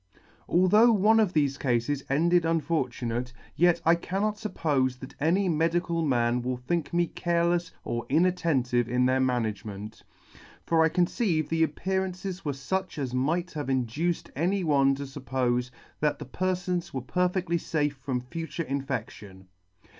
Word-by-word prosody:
" -, -, -31 dB
Although 210 Hz, +7 st, +5 dB
one 215 Hz, +2 st, +4 dB
of 205 Hz, -5 st, +2 dB
thefe 140 Hz, -3 st, +1 dB
cafes 130 Hz, +2 st, 0 dB
ended 170 Hz, +5 st, +3 dB
unfortunate, 130 Hz, -7 st, -1 dB, 0.2 s
yet 175 Hz, +1 st, +4 dB
I 165 Hz, -, +6 dB
cannot 195 Hz, +5 st, -1 dB
fuppofe 140 Hz, -, 0 dB
that 130 Hz, 0 st, -10 dB
any 180 Hz, +6 st, +2 dB
medical 165 Hz, +1 st, +1 dB
man 120 Hz, -4 st, +1 dB
will 125 Hz, +1 st, -2 dB
think 145 Hz, +5 st, -2 dB
me 175 Hz, 0 st, +2 dB
carelefs 170 Hz, 0 st, 0 dB
or 120 Hz, 0 st, -3 dB
inatten 165 Hz, -4 st, +2 dB
tive 120 Hz, -1 st, +1 dB
in 125 Hz, +1 st, +2 dB
their 130 Hz, +1 st, +2 dB
management; 110 Hz, -5 st, -2 dB, 0.6 s
for 165 Hz, -1 st, +3 dB
I 160 Hz, -, +4 dB
conceive 175 Hz, -, 0 dB
the 165 Hz, 0 st, 0 dB
appearances 185 Hz, +3 st, -2 dB
were 145 Hz, -, -1 dB
fuch 185 Hz, +9 st, -3 dB
as 130 Hz, -4 st, -3 dB
might 165 Hz, +7 st, 0 dB
have 145 Hz, -3 st, -4 dB
induced 135 Hz, +7 st, -1 dB
any 180 Hz, +6 st, 0 dB
one 140 Hz, -4 st, +3 dB
to 140 Hz, -, -5 dB
fuppofe 130 Hz, -2 st, -1 dB, 0.3 s
that 150 Hz, -1 st, +1 dB
the -, -, -8 dB
perfons 180 Hz, +3 st, -2 dB
were 130 Hz, -, -1 dB
perfectly 180 Hz, +4 st, 0 dB
fafe 150 Hz, -3 st, -1 dB
from 130 Hz, -2 st, -3 dB
future 165 Hz, +6 st, -5 dB
infection. 130 Hz, -, -5 dB
155 Hz, 150 wpm, -27 LUFS, 130-175 Hz, 0.6 s, I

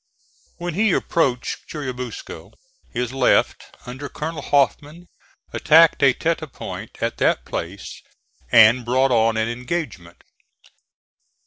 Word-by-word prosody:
When 175 Hz, -1 st, -4 dB
he 205 Hz, +2 st, +2 dB
approached 130 Hz, -7 st, -1 dB
Churubusco 125 Hz, -5 st, -7 dB, 0.4 s
his 125 Hz, +1 st, -3 dB
left, 135 Hz, -, +2 dB, 0.2 s
under 130 Hz, +3 st, -7 dB
Colonel 160 Hz, +1 st, -5 dB
Hoffman, 145 Hz, +4 st, 0 dB, 0.5 s
attacked 165 Hz, +1 st, +5 dB
a 140 Hz, -, +6 dB
tete 165 Hz, +6 st, -1 dB
de 155 Hz, -, -7 dB
pont 135 Hz, -, -9 dB
at -, -, -2 dB
that -, -, +1 dB
place 90 Hz, +4 st, -6 dB, 0.5 s
and 115 Hz, +3 st, +6 dB
brought 130 Hz, +3 st, +1 dB
on 115 Hz, -1 st, +2 dB
an 110 Hz, 0 st, 0 dB
engagement. 120 Hz, -, -5 dB
130 Hz, 115 wpm, -21 LUFS, 120-155 Hz, 0.5 s, a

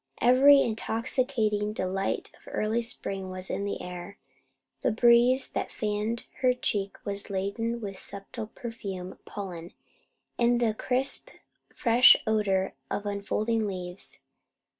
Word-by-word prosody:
Every 275 Hz, +3 st, +7 dB
intoxicating 220 Hz, -2 st, -1 dB
delight 195 Hz, -1 st, -2 dB
of -, -, -23 dB
early 220 Hz, +2 st, 0 dB
spring 195 Hz, -5 st, -3 dB
was 185 Hz, 0 st, -5 dB
in 200 Hz, -, -2 dB
the 200 Hz, -, -3 dB
air. 180 Hz, +2 st, -7 dB, 0.6 s
The -, -, +2 dB
breeze 240 Hz, +3 st, +5 dB
that -, -, -3 dB
fanned 215 Hz, +2 st, -2 dB
her 250 Hz, -1 st, +3 dB
cheek 200 Hz, -5 st, -2 dB
was 200 Hz, 0 st, -3 dB
laden 215 Hz, +5 st, -2 dB
with 195 Hz, -3 st, -6 dB
subtle 200 Hz, +2 st, -4 dB
perfume 195 Hz, -6 st, -6 dB
of -, -, -18 dB
pollen 175 Hz, -4 st, -7 dB, 0.7 s
and 240 Hz, 0 st, +3 dB
the 230 Hz, -3 st, +2 dB
crisp 255 Hz, +4 st, 0 dB, 0.5 s
fresh 245 Hz, -1 st, +7 dB
odour 205 Hz, -4 st, +1 dB, 0.2 s
of 205 Hz, -, -3 dB
unfolding 210 Hz, +2 st, -1 dB
leaves. 180 Hz, -1 st, -4 dB
215 Hz, 125 wpm, -28 LUFS, 195-235 Hz, 0.7 s, Every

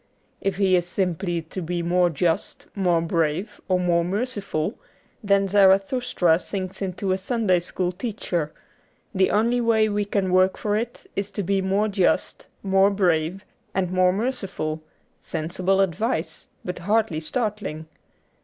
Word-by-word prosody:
If 195 Hz, -1 st, 0 dB
he 190 Hz, -2 st, +3 dB
is 175 Hz, -1 st, +1 dB
simply 175 Hz, -2 st, -1 dB
to 175 Hz, +4 st, -6 dB
be 175 Hz, +1 st, -2 dB
more 175 Hz, +1 st, +3 dB
just, 165 Hz, +1 st, -1 dB
more 180 Hz, -4 st, +2 dB
brave, 165 Hz, +4 st, -1 dB
or 185 Hz, -1 st, +2 dB
more 175 Hz, -1 st, +2 dB
merciful, 200 Hz, -3 st, -2 dB, 0.5 s
then 200 Hz, -1 st, +3 dB
Zarathustra 195 Hz, -2 st, +3 dB
sinks 190 Hz, 0 st, -5 dB
into 190 Hz, 0 st, -2 dB
a 190 Hz, -, +1 dB
Sunday 200 Hz, -3 st, +1 dB
school 175 Hz, +1 st, -2 dB
teacher; 180 Hz, -6 st, -3 dB, 0.6 s
the 190 Hz, 0 st, +3 dB
only 235 Hz, +3 st, +2 dB
way 220 Hz, -2 st, +3 dB
we 205 Hz, 0 st, 0 dB
can 195 Hz, -2 st, 0 dB
work 185 Hz, +1 st, +4 dB
for 210 Hz, -1 st, -1 dB
it 230 Hz, +2 st, -4 dB
is 200 Hz, 0 st, -2 dB
to 205 Hz, -, -4 dB
be 195 Hz, +1 st, +1 dB
more 195 Hz, +3 st, +1 dB
just, 195 Hz, -3 st, 0 dB, 0.2 s
more 195 Hz, 0 st, +4 dB
brave, 185 Hz, -1 st, 0 dB, 0.3 s
and 185 Hz, -2 st, 0 dB
more 185 Hz, 0 st, +4 dB
merciful 195 Hz, -8 st, -3 dB, 0.2 s
— -, -, -42 dB
sensible 180 Hz, +4 st, -1 dB
advice, 190 Hz, -1 st, -2 dB, 0.2 s
but 180 Hz, 0 st, -4 dB
hardly 205 Hz, -2 st, +1 dB
startling. 205 Hz, -4 st, -3 dB
190 Hz, 145 wpm, -24 LUFS, 175-205 Hz, 0.6 s, work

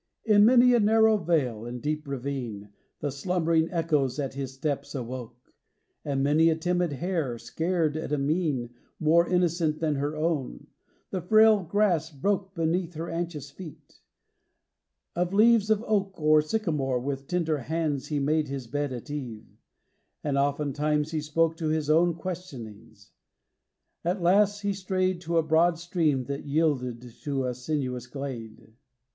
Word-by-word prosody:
In 210 Hz, -2 st, +6 dB
many 250 Hz, +1 st, +6 dB
a 240 Hz, -, +5 dB
narrow 220 Hz, +1 st, +5 dB
vale 150 Hz, -, 0 dB
and 125 Hz, +1 st, -5 dB
deep 150 Hz, +2 st, -3 dB
ravine 125 Hz, -6 st, -5 dB, 0.3 s
The 145 Hz, -, -1 dB
slumbering 165 Hz, +2 st, +1 dB
echoes 155 Hz, -7 st, 0 dB
at 135 Hz, -3 st, -3 dB
his 135 Hz, -1 st, -4 dB
steps 140 Hz, +1 st, -3 dB
awoke; 125 Hz, -1 st, -7 dB, 0.5 s
And 135 Hz, -2 st, -1 dB
many 155 Hz, +3 st, +4 dB
a 160 Hz, -, +2 dB
timid 175 Hz, 0 st, 0 dB
hare, 160 Hz, -5 st, -2 dB
scared 165 Hz, +3 st, -1 dB
at 155 Hz, -, -4 dB
a 150 Hz, -, +1 dB
mien 140 Hz, -4 st, -1 dB, 0.3 s
More 165 Hz, +2 st, +3 dB
innocent 170 Hz, -3 st, +1 dB
than 155 Hz, -3 st, 0 dB
her 145 Hz, +2 st, -2 dB
own, 155 Hz, -4 st, -2 dB, 0.5 s
the 185 Hz, -, -2 dB
frail 215 Hz, +3 st, +5 dB
grass 175 Hz, -3 st, +1 dB
broke 190 Hz, +6 st, -2 dB
Beneath 170 Hz, +1 st, -1 dB
her 165 Hz, +2 st, -5 dB
anxious 165 Hz, -4 st, -4 dB
feet. 160 Hz, 0 st, -12 dB, 1.2 s
Of 180 Hz, +2 st, -1 dB
leaves 220 Hz, 0 st, +5 dB
of 220 Hz, 0 st, +2 dB
oak 195 Hz, -3 st, -1 dB
Or 155 Hz, 0 st, +5 dB
sycamore 150 Hz, -, -1 dB
with 135 Hz, +1 st, -4 dB
tender 160 Hz, -4 st, 0 dB
hands 155 Hz, 0 st, -2 dB
he 150 Hz, -, -2 dB
made 150 Hz, +2 st, +1 dB
His 135 Hz, -2 st, -5 dB
bed 145 Hz, +3 st, -2 dB
at 125 Hz, +3 st, -7 dB
eve; 125 Hz, -7 st, -6 dB, 0.8 s
and 145 Hz, -2 st, -1 dB
oftentimes 150 Hz, +2 st, 0 dB
he 155 Hz, -2 st, -1 dB
spoke 165 Hz, +2 st, +1 dB
To 160 Hz, -, -2 dB
his 155 Hz, -1 st, 0 dB
own 170 Hz, +1 st, +4 dB
questionings. 135 Hz, -, -8 dB, 0.9 s
At 180 Hz, +3 st, 0 dB
last 205 Hz, +3 st, +3 dB
he 200 Hz, -1 st, 0 dB
strayed 185 Hz, -1 st, -1 dB
To 170 Hz, 0 st, -1 dB
a 165 Hz, -, +4 dB
broad 165 Hz, +2 st, +3 dB
stream 165 Hz, -6 st, 0 dB
that 140 Hz, +3 st, -6 dB
yielded 140 Hz, -6 st, 0 dB, 0.2 s
to 140 Hz, -3 st, -2 dB
a 125 Hz, -, -1 dB
sinuous 125 Hz, -2 st, -3 dB
glade. 125 Hz, -5 st, -6 dB
XXIII. 110 Hz, -, -22 dB
155 Hz, 155 wpm, -27 LUFS, 140-175 Hz, 1.2 s, In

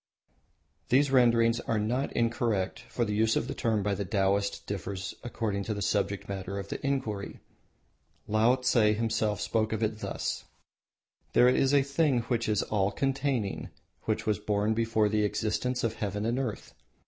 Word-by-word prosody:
These 135 Hz, +2 st, +4 dB
renderings 115 Hz, -2 st, +4 dB
are 115 Hz, -, -1 dB
not 120 Hz, +6 st, -1 dB
incorrect, 115 Hz, -5 st, 0 dB
for 120 Hz, -, 0 dB
the 105 Hz, -, -2 dB
use 110 Hz, +1 st, +2 dB
of -, -, 0 dB
the -, -, -3 dB
term 110 Hz, -3 st, 0 dB
by 105 Hz, 0 st, 0 dB
the 100 Hz, -, -2 dB
Taoists 100 Hz, +1 st, +1 dB
differs 100 Hz, -1 st, -5 dB
according 110 Hz, -4 st, -2 dB
to 110 Hz, -, -2 dB
the 100 Hz, -, -4 dB
subject 100 Hz, 0 st, -1 dB
matter 100 Hz, 0 st, -4 dB
of 100 Hz, 0 st, -6 dB
the -, -, -5 dB
inquiry. 130 Hz, -8 st, -2 dB, 0.9 s
Laotse 125 Hz, +4 st, +3 dB, 0.2 s
himself 110 Hz, -2 st, 0 dB
spoke 110 Hz, +1 st, 0 dB
of 110 Hz, 0 st, -1 dB
it 110 Hz, 0 st, -1 dB
thus: -, -, -3 dB, 0.9 s
"There 125 Hz, -, +6 dB
is 135 Hz, +1 st, +3 dB
a 140 Hz, -1 st, +5 dB
thing 140 Hz, -2 st, +1 dB
which 115 Hz, -1 st, -1 dB
is 105 Hz, -2 st, +2 dB
all 100 Hz, -2 st, +1 dB
containing, 135 Hz, -6 st, -1 dB, 0.4 s
which -, -, -1 dB
was 105 Hz, -3 st, +1 dB
born 105 Hz, +1 st, 0 dB
before 115 Hz, -1 st, +2 dB
the 105 Hz, 0 st, +1 dB
existence 105 Hz, +4 st, -1 dB
of 115 Hz, -1 st, 0 dB
Heaven 105 Hz, -1 st, -3 dB
and 120 Hz, +3 st, 0 dB
Earth. 125 Hz, -6 st, -4 dB
110 Hz, 165 wpm, -29 LUFS, 105-120 Hz, 0.9 s, There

